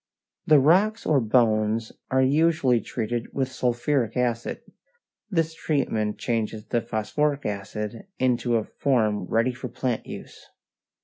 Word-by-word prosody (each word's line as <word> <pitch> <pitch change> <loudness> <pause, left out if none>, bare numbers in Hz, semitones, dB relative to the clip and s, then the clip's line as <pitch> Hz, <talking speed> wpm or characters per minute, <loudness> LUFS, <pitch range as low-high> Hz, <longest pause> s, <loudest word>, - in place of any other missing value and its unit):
The 155 - +7
rocks 190 +11 +3
or 150 -3 +4
bones 110 -1 +2 0.2
are 130 0 +3
usually 140 -3 +3
treated 115 +2 -4
with 130 -1 -1
sulphuric 125 -1 0
acid. 120 -2 -1 0.7
This 165 -4 0
treatment 110 -10 -1
changes 110 -2 -2
the 120 - 0
phosphoric 140 +8 -1
acid 105 - -5
into 125 -1 +1
a 110 - +2
form 110 -7 0
ready 115 +3 +1
for 130 +1 -6
plant 125 -1 -3
use. - - -10
125 Hz, 125 wpm, -25 LUFS, 110-140 Hz, 0.7 s, The